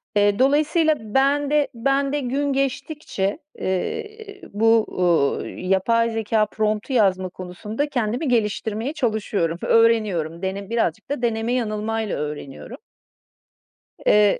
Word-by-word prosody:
Eee, 205 +1 +3
dolayısıyla 305 +4 +3
ben 275 +6 +1
de, 300 -1 +3
ben 275 +4 +1
de 295 - +1
gün 280 +2 -1
geçtikçe, 275 -5 -2 0.2
eee, 415 - -4
bu, 225 +1 +4
ııı, 170 -6 +2
yapay 210 +5 +1
zekâ 220 -1 +1
prompt'u 215 +4 -2
yazma 190 -5 +2
konusunda 210 +10 -5
kendimi 245 +2 -1
geliştirmeye 225 +2 0
çalışıyorum, 210 - -1
öğreniyorum. 205 -8 +2
Dene 195 +1 -4
birazcık 225 -6 -1
da 285 -3 -2
deneme 230 0 0
yanılmayla 220 -2 -1
öğreniyorum. 145 - -6 1.3
Eee 210 -1 +4
225 Hz, 115 wpm, -22 LUFS, 200-275 Hz, 1.3 s, bu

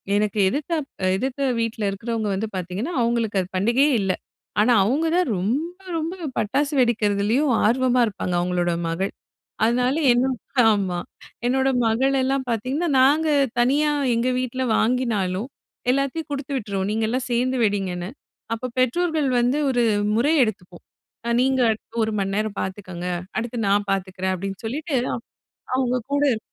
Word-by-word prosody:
எனக்கு 210 0 0
எதிர்த்தாப் 300 - -2 0.3
எதிர்த்த 265 +5 -1
வீட்ல 225 -1 -2
இருக்கிறவங்க 220 +2 -3
வந்து 210 +3 -2
பார்த்தீங்கன்னா, 185 - -3
அவங்களுக்கு 230 -4 +1
அது 180 - -5
பண்டிகையே 240 +10 +3
இல்ல. 190 -1 +1 0.5
ஆனா, 240 +3 +4
அவங்க 285 +9 +1
தான் 360 - +2
ரொம்ப 245 - 0 0.3
ரொம்ப 325 +2 -2 0.2
பட்டாசு 280 +7 0
வெடிக்கிறதுலயும் 230 +3 +2
ஆர்வமா 255 +2 +3
இருப்பாங்க, 185 -3 -3
அவங்களோட 175 0 0 0.2
மகள். 185 +4 -2 0.5
அதனால 250 +3 +2 0.2
என்ன 245 +2 +3 0.4
ஆமா. 190 -4 0 0.5
என்னோட 265 +2 +2 0.2
மகளெல்லாம் 265 +3 +1
பார்த்தீங்கன்னா, 255 +9 -1
நாங்க 290 +5 +4 0.3
தனியா 285 +5 +3 0.2
எங்க 235 +2 +1
வீட்ல 255 +1 -2
வாங்கினாலும் 220 -4 0 0.4
எல்லாத்தையும் 275 +4 -1
குடுத்து 280 0 -4
விட்டுற்றுவோம், 200 -5 -2
நீங்கலாம் 225 +4 -1
சேர்ந்து 255 +2 +1
வெடிங்கன்னு. 190 -3 -1 0.4
அப்ப 250 +3 -4
பெற்றோர்கள் 310 +3 +1
வந்து 245 +4 +2
ஒரு 245 -2 +2 0.3
முறை 280 +7 +3
எடுத்துப்போம். 180 -5 -5 0.6
நீங்க 265 0 +2
அடுத்து 220 +1 -8
1 220 - -1
மணிநேரம் 200 +1 -1
பார்த்துக்கோங்க. 185 -2 -5 0.3
அடுத்து 235 +2 -3
நான் 205 0 +2
பார்த்துக்குறேன் 190 -1 -1
அப்படின்னு 195 +1 -5
சொல்லிட்டு, 285 +4 -2 0.8
அவங்க 255 -1 +1 0.2
கூட 285 - +2
இருப்போம். 220 - -3
235 Hz, 130 wpm, -23 LUFS, 200-265 Hz, 0.8 s, ஆனா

